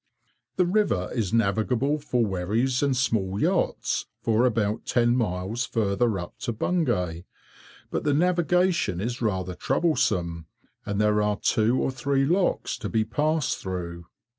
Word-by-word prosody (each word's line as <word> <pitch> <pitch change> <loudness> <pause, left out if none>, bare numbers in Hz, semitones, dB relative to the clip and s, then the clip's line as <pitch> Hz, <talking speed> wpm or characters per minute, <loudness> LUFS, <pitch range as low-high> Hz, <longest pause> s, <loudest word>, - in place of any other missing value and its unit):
The 180 - +3
river 175 - +1
is 110 -6 -1
navigable 115 +6 +1
for 125 -5 0
wherries 110 +7 0
and 140 -3 +1
small 105 -6 0
yachts, - - 0 0.2
for 115 +2 +3
about 110 -2 -1
ten 120 0 +3
miles 105 +1 -1
further 110 0 0
up 90 -1 -8
to - - -2
Bungay, 90 - -1 0.7
but - - -2
the 145 -1 +2
navigation 175 - +2
is 120 +5 -3
rather 95 -5 -1
troublesome, 85 - 0 0.4
and 100 0 -1
there 105 0 +3
are 105 0 0
two 115 +4 +2
or - - 0
three 135 +2 0
locks 180 +5 0
to - - -4
be 110 -1 +1
passed 150 +5 0
through. 85 -2 -5
115 Hz, 140 wpm, -26 LUFS, 100-135 Hz, 0.7 s, The